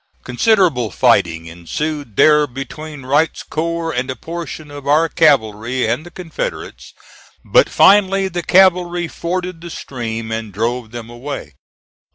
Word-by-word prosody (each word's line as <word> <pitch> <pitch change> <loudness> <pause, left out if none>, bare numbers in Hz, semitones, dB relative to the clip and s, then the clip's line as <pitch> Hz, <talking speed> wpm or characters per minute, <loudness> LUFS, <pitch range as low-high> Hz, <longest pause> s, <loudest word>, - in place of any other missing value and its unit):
Considerable 155 - +2
fighting 85 -3 +2
ensued 115 - -5
there 150 +3 +5
between 135 +2 -8
Wright's 145 +4 +1
corps 165 +1 -3
and 125 +1 -2
a 130 - -3
portion 160 +1 -7
of 145 -1 -9
our 155 +3 +4
cavalry 125 -7 +2
and 120 +7 -1
the 175 - -11
Confederates, 180 - -6 0.5
but - - +4
finally 195 -1 +4
the 175 -1 -3
cavalry 175 -2 +3
forded 180 0 -4
the 170 - -8
stream 115 -7 -5
and 110 -1 -4
drove 115 +3 -2
them 115 0 -8
away. 120 - -7
150 Hz, 135 wpm, -18 LUFS, 120-170 Hz, 0.5 s, there